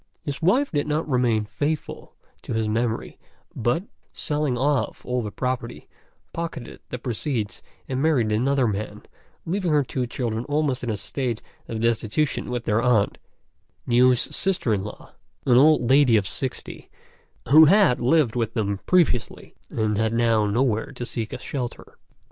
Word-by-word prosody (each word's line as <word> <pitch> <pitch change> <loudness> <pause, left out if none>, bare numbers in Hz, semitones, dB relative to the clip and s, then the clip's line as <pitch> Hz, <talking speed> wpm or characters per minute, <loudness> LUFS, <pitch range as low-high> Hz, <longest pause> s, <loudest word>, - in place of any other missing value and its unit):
His 145 +2 -5
wife 250 - +3
did 145 -2 -1
not 155 +2 -1
remain 120 -5 +1
faithful 150 +7 -4 0.3
to - - -5
his 110 -1 0
memory, 110 +1 -2 0.4
but, 120 +10 0 0.3
selling 150 -4 -1
off 140 +2 0
all 125 0 -1
the 105 - -4
property, 125 +1 -4 0.5
pocketed 165 -7 -6
the 125 - -4
proceeds 120 -2 -3 0.3
and 130 0 -2
married 135 -9 +2
another 130 +4 +2
man, 105 0 -4 0.4
leaving 180 0 -1
her 150 -1 +4
two 125 -1 -3
children 115 -2 -3
almost 145 -3 0
in 120 - -2
a 110 - -1
state 120 +1 -3 0.2
of 110 -1 -4
destitution 115 +6 0
with 120 -1 -3
their 110 0 +2
aunt, 120 -5 +2 0.7
Niu's 125 +1 +4
sister 185 - 0
in 95 -2 -1
law, 105 - -9 0.3
an 125 -2 +5
old 150 -2 +5
lady 130 -3 +5
of 100 -2 0
sixty, 130 +5 -5 0.6
who 155 +4 +9
had 190 -5 +5
lived 130 -2 +2
with 115 -2 -1
them 100 -3 -1
previously, 170 -11 +1 0.2
and 110 -2 -1
had 110 0 +1
now 115 -2 +2
nowhere 115 +2 0
to 125 -2 -5
seek 115 -2 -4
a - - -4
shelter. 125 -4 -6
125 Hz, 155 wpm, -24 LUFS, 110-145 Hz, 0.7 s, who